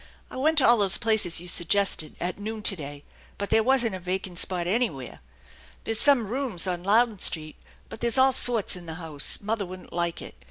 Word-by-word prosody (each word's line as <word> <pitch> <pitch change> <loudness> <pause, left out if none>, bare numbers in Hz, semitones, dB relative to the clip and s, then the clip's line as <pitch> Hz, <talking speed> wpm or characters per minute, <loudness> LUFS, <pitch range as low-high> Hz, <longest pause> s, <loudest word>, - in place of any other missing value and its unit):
I - - -9
went 310 +5 0
to 270 - +7
all 240 -1 +5
those 195 -3 +2
places 215 -7 0
you 175 - -9
suggested 175 -2 +1
at 180 +3 -5
noon 215 +1 -6
to 195 - +7
day, 145 -3 -9 0.3
but 200 - -6
there 225 - +4
wasn't 240 -2 +1
a 185 - -6
vacant 185 0 -5
spot 180 -2 -2
anywhere. 180 - -3 0.6
There's 225 -1 0
some 275 -6 +4
rooms 230 -5 -1
on 180 -2 -3
Louden 220 +1 +2
Street, 155 -3 -1 0.3
but - - -11
there's 235 +2 +1
all 265 0 +5
sorts 235 -6 +2
in 175 -2 -11
the 160 - -6
house. 160 -4 -2
Mother 215 0 -3
wouldn't 185 0 -11
like 170 -1 -2
it. - - -9
200 Hz, 205 wpm, -25 LUFS, 175-230 Hz, 0.6 s, to